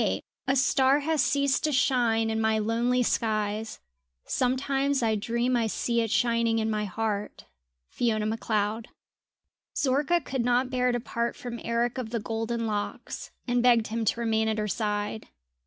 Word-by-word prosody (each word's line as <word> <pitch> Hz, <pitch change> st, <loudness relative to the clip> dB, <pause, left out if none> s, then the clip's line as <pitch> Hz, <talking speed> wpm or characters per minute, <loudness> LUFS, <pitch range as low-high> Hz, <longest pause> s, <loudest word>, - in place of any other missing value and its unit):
XXVIII -, -, 0 dB, 0.2 s
A 270 Hz, -, +3 dB
star 265 Hz, +1 st, +4 dB
has 310 Hz, 0 st, +1 dB
ceased 280 Hz, +1 st, +2 dB
to 305 Hz, -, +1 dB
shine 240 Hz, -4 st, +2 dB
in 220 Hz, 0 st, -1 dB
my 220 Hz, 0 st, +2 dB
lonely 235 Hz, +3 st, +1 dB
skies, 215 Hz, -1 st, -1 dB, 0.5 s
Sometimes 270 Hz, +1 st, 0 dB
I 220 Hz, -1 st, +2 dB
dream 235 Hz, +4 st, 0 dB
I 230 Hz, -2 st, +1 dB
see 235 Hz, +2 st, 0 dB
it 225 Hz, -, -1 dB
shining 230 Hz, 0 st, +2 dB
in 220 Hz, 0 st, 0 dB
my 210 Hz, -1 st, -1 dB
heart. 210 Hz, +1 st, -3 dB, 0.5 s
FIONA 220 Hz, -3 st, 0 dB
MACLEOD. 220 Hz, 0 st, -1 dB, 0.9 s
Zorka 290 Hz, +6 st, +2 dB
could 260 Hz, -2 st, -2 dB
not 245 Hz, +2 st, +1 dB
bear 250 Hz, -1 st, +2 dB
to 240 Hz, -, 0 dB
part 235 Hz, 0 st, -2 dB
from 240 Hz, -1 st, -6 dB
Eric 235 Hz, +2 st, 0 dB
of 235 Hz, -3 st, -4 dB
the 230 Hz, 0 st, -2 dB
golden 225 Hz, +2 st, -2 dB
locks, 210 Hz, -2 st, -4 dB, 0.2 s
and 245 Hz, 0 st, +2 dB
begged 235 Hz, -3 st, +4 dB
him 225 Hz, +1 st, -2 dB
to 230 Hz, -, +1 dB
remain 220 Hz, -1 st, +1 dB
at 220 Hz, 0 st, 0 dB
her 210 Hz, 0 st, -1 dB
side. 210 Hz, 0 st, -2 dB
230 Hz, 165 wpm, -27 LUFS, 220-250 Hz, 0.9 s, star